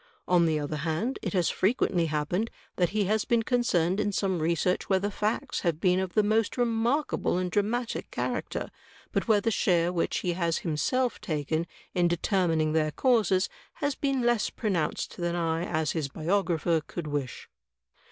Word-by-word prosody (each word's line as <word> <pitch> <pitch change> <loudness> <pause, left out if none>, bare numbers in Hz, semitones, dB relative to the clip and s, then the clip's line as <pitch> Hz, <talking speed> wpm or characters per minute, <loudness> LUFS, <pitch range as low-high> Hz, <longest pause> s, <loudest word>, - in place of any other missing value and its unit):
On 175 -2 +4
the 155 -1 +1
other 150 +1 -3
hand, 165 - -2
it - - -3
has 180 -4 +2
frequently 185 -4 +1
happened 155 +8 -1 0.3
that 175 -2 +2
he 210 0 0
has 215 +2 +1
been 235 -1 +2
concerned 205 -7 +1
in 205 -1 +1
some 190 -3 0
research 170 +3 0
where 190 - +4
the 200 +2 -2
facts 220 +7 -1
have 170 -4 -1
been 180 0 +3
of 190 -2 -3
the 215 - +5
most 215 +3 +1
remarkable 240 - +1
and 180 -1 -1
dramatic 225 +4 -1
character, - - -3 0.4
but - - -1
where 215 -3 +4
the 225 - +1
share 175 -4 +2
which 170 - 0
he 180 - 0
has 170 -2 0
himself 235 - 0
taken 160 -3 -1 0.3
in 175 -1 +3
determining 170 -3 +1
their 155 -1 +2
causes 200 - +2 0.3
has 285 -1 -1
been 270 -2 -1
less 240 -3 +2
pronoimced 185 -9 -2
than 175 -1 -1
I, 165 0 0
as 155 -3 0
his 155 -4 -2
biographer, 165 +1 0
could 175 - -5
wish. 145 -4 -4
180 Hz, 170 wpm, -28 LUFS, 165-215 Hz, 0.4 s, the